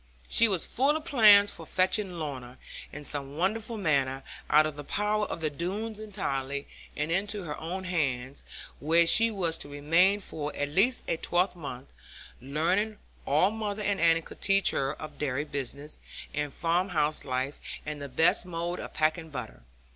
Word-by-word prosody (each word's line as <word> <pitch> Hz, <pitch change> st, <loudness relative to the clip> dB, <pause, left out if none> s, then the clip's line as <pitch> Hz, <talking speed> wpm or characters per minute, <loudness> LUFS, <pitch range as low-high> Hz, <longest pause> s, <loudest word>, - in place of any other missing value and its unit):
She 230 Hz, -, +5 dB
was 190 Hz, -6 st, 0 dB
full 280 Hz, +5 st, +1 dB
of 315 Hz, -, -10 dB
plans 210 Hz, -7 st, +7 dB
for 165 Hz, -, -6 dB
fetching 185 Hz, +4 st, +1 dB
Lorna, 135 Hz, -6 st, -6 dB, 0.3 s
in 150 Hz, 0 st, -8 dB
some 140 Hz, 0 st, -2 dB
wonderful 220 Hz, +6 st, -1 dB
manner, 135 Hz, -7 st, 0 dB, 0.3 s
out 155 Hz, +1 st, +6 dB
of 155 Hz, -2 st, -4 dB
the 145 Hz, -, -7 dB
power 210 Hz, +6 st, 0 dB
of 165 Hz, -, -5 dB
the 155 Hz, -1 st, -1 dB
Doones 205 Hz, +8 st, -3 dB
entirely, 140 Hz, -10 st, -4 dB, 0.3 s
and 150 Hz, +2 st, -2 dB
into 200 Hz, +3 st, 0 dB
her 150 Hz, -3 st, -5 dB
own 180 Hz, +4 st, -5 dB
hands, 140 Hz, -7 st, -2 dB, 0.4 s
where 165 Hz, +3 st, +3 dB
she 225 Hz, +7 st, +8 dB
was 180 Hz, -7 st, -1 dB
to -, -, -3 dB
remain 165 Hz, +8 st, +3 dB
for 150 Hz, -6 st, -5 dB
at 145 Hz, -, -2 dB
least 210 Hz, -, +3 dB
a 165 Hz, -, 0 dB
twelve 180 Hz, +3 st, 0 dB
month, 140 Hz, -6 st, -8 dB, 0.5 s
learning 175 Hz, -, 0 dB, 0.3 s
all 155 Hz, +8 st, +3 dB
mother 210 Hz, -1 st, -4 dB
and 200 Hz, -2 st, 0 dB
Annie 165 Hz, -1 st, +4 dB
could -, -, -13 dB
teach 195 Hz, -1 st, +3 dB
her 135 Hz, 0 st, -1 dB
of 150 Hz, -2 st, -9 dB
dairy 145 Hz, 0 st, -1 dB
business, 140 Hz, +1 st, -5 dB, 0.3 s
and 150 Hz, -1 st, -2 dB
farm 175 Hz, +6 st, 0 dB
house 155 Hz, -2 st, 0 dB
life, 130 Hz, +1 st, -3 dB, 0.3 s
and 150 Hz, -1 st, -5 dB
the 140 Hz, -, -6 dB
best 160 Hz, +6 st, +3 dB
mode 175 Hz, 0 st, -4 dB
of -, -, -8 dB
packing 160 Hz, +1 st, 0 dB
butter. 125 Hz, -, -7 dB
165 Hz, 175 wpm, -28 LUFS, 145-195 Hz, 0.5 s, she